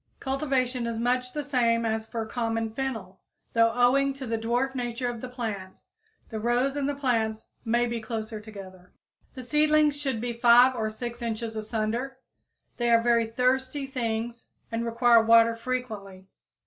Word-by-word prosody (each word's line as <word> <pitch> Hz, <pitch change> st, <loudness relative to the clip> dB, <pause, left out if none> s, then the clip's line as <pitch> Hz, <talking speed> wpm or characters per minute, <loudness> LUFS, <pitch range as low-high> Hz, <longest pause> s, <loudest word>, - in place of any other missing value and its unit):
Cultivation 265 Hz, -3 st, -1 dB
is 230 Hz, -1 st, -3 dB
much 250 Hz, +1 st, 0 dB
the 295 Hz, +1 st, -3 dB
same 235 Hz, -4 st, +1 dB
as 220 Hz, 0 st, -1 dB
for 225 Hz, -1 st, -4 dB
common 225 Hz, -1 st, -2 dB
fennel, 225 Hz, -8 st, -4 dB, 0.3 s
though 230 Hz, 0 st, +4 dB
owing 265 Hz, +3 st, +3 dB
to 270 Hz, -1 st, -7 dB
the 230 Hz, -1 st, -1 dB
dwarf 240 Hz, +4 st, 0 dB
nature 245 Hz, -1 st, -3 dB
of 240 Hz, -2 st, -4 dB
the 255 Hz, -, -6 dB
plant 215 Hz, -7 st, -6 dB, 0.5 s
the 220 Hz, -, -4 dB
rows 245 Hz, +4 st, +1 dB
and 285 Hz, -1 st, -1 dB
the 285 Hz, -, -2 dB
plants 225 Hz, -5 st, -1 dB, 0.2 s
may 240 Hz, +1 st, +2 dB
be 235 Hz, -1 st, -3 dB
closer 220 Hz, -1 st, -5 dB
together. 190 Hz, -4 st, -12 dB, 0.4 s
The 255 Hz, -, -7 dB
seedlings 300 Hz, +2 st, +3 dB
should 270 Hz, -5 st, -2 dB
be 240 Hz, +1 st, -3 dB
5 240 Hz, +2 st, +6 dB
or 220 Hz, -2 st, -1 dB
6 235 Hz, +2 st, -6 dB
inches 225 Hz, -1 st, -3 dB
asunder. 225 Hz, +4 st, -3 dB, 0.6 s
They 240 Hz, -1 st, 0 dB
are 230 Hz, 0 st, +6 dB
very 235 Hz, -1 st, +2 dB
thirsty 260 Hz, +4 st, 0 dB
things 235 Hz, -3 st, -3 dB, 0.2 s
and 230 Hz, +1 st, -2 dB
require 235 Hz, 0 st, +5 dB
water 230 Hz, 0 st, +5 dB
frequently. 220 Hz, -6 st, -5 dB
235 Hz, 160 wpm, -27 LUFS, 225-255 Hz, 0.6 s, 5